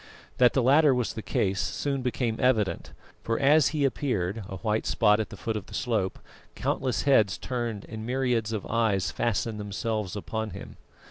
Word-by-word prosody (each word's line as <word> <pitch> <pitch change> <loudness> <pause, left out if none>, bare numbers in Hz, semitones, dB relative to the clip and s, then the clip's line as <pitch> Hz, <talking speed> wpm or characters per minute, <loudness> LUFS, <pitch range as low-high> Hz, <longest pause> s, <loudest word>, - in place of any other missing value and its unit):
That 125 -1 +6
the 130 - +2
latter 140 +2 +5
was 125 -2 -1
the 110 - -5
case 100 -2 0
soon 140 -2 -2
became 120 -2 -1
evident, 110 -6 +1 0.3
for 115 - -1
as 145 +2 +5
he 150 -3 0
appeared, 110 -7 -1
a 95 - -5
white 110 +1 -1
spot 105 -2 +3
at 110 - -2
the 105 - -10
foot 110 +3 -3
of 105 -4 -5
the - - -9
slope, 110 -7 -1 0.4
countless 130 -2 -1
heads 110 -9 +4
turned 120 -5 -4
and 110 0 -7
myriads 125 -3 0
of 110 -3 -3
eyes 105 -6 +1
fastened 115 -1 -1
themselves 105 0 -3
upon 110 +3 -3
him. - - -10
115 Hz, 180 wpm, -27 LUFS, 105-125 Hz, 0.4 s, That